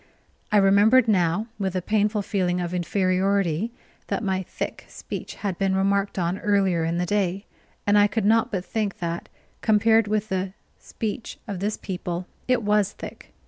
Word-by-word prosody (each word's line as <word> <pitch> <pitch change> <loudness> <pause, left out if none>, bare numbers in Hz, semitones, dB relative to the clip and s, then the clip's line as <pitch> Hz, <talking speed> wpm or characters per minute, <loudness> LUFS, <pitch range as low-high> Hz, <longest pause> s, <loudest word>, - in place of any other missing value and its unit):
I 210 - +5
remembered 205 +5 +5
now 185 0 +2
with 190 -2 -1
a - - +2
painful 210 0 +1
feeling 185 -3 0
of 175 0 -3
inferiority 185 +1 +1 0.4
that - - -2
my 190 -2 0
thick 185 - -5
speech - - -7
had 195 -4 -4
been 195 -1 +2
remarked 195 +1 +1
On 175 +1 0
earlier 195 -5 +2
in 165 +1 0
the 180 - 0
day; 195 0 0 0.4
and 205 0 +5
I 205 - +6
could 215 -1 -1
not 225 +2 +3
but 185 -2 -2
think 215 -3 -2
that, 170 -1 -4 0.3
compared 220 0 +4
with 215 0 -1
the 190 0 -2 0.3
speech 220 0 -5
of 200 -4 -4
this 210 +3 -1
people, 180 -2 -4 0.2
it 255 -3 +2
was 210 -1 +2
thick. - - -10
200 Hz, 170 wpm, -24 LUFS, 185-210 Hz, 0.4 s, I